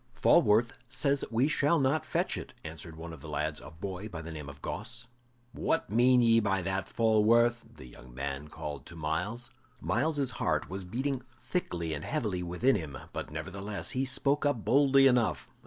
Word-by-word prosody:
"Falworth 110 +3 +4 0.2
says 140 +2 +1
we 120 +4 +2
shall 150 +2 +3
not 140 +2 +1
fetch - - 0
it," - - -7
answered 80 0 -8
one 80 +1 -8
of 75 - -11
the 80 - -9
lads, 75 +1 -2
a - - -10
boy 95 +5 -6
by 85 -5 -6
the 80 +1 -7
name 75 -3 -7
of 70 0 -11
Gosse. 120 - -6 0.4
"What - - -1
mean 125 +2 +5
ye 115 -1 +5
by 95 -3 0
that, 95 +1 -2
Falworth?" 115 +1 +3
the - - -11
young 60 0 -13
man 70 +3 -4
called 75 -3 -7
to 85 - -11
Myles. 90 +11 -3 0.3
Myles's 135 - 0
heart - - -1
was 95 0 -5
beating 130 +7 -2 0.2
thickly 85 - -2
and 75 - -4
heavily 105 -12 -2
within 90 +10 +2
him, 80 -8 -4 0.2
but - - -4
nevertheless 95 - -4
he 130 -1 0
spoke 140 +2 +2
up 145 -7 0
boldly 135 0 +5
enough. 125 -4 +3
105 Hz, 180 wpm, -30 LUFS, 80-130 Hz, 0.4 s, mean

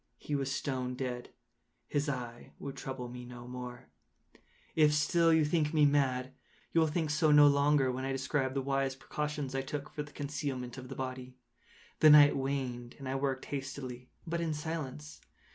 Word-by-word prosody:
He 150 - -6
was 135 -1 0
stone 130 -2 -2
dead. 125 -1 -4 0.6
His 145 +1 0
eye 120 -3 -5
would 140 -1 -6
trouble 130 -2 -5
me 125 0 -8
no 120 0 -10
more. 125 -6 -8 0.9
If 150 -2 +5
still 165 +2 +3
you 160 -1 +4
think 155 0 +1
me 150 -1 +6
mad, 130 -3 +1 0.4
you 165 - +5
will 160 - +4
think 155 0 -1
so 155 +1 +3
no 150 0 +8
longer 140 -2 +4
when 130 +1 -4
I 135 - -1
describe 135 0 -1
the 135 - 0
wise 135 0 0
precautions 150 0 -4
I 135 - 0
took 140 +1 -5
for 150 - -3
the 145 0 -8
concealment 140 -4 -4
of 130 -1 -10
the 135 - -6
body. 130 -1 -6 0.6
The 155 - +8
night 145 -1 +8
waned, 130 -3 -3
and 135 -3 -8
I 130 - -1
worked 135 -1 -1
hastily, 135 -3 -6 0.2
but 170 0 -2
in 160 -2 -1
silence. 135 - -5
135 Hz, 180 wpm, -32 LUFS, 130-150 Hz, 0.9 s, no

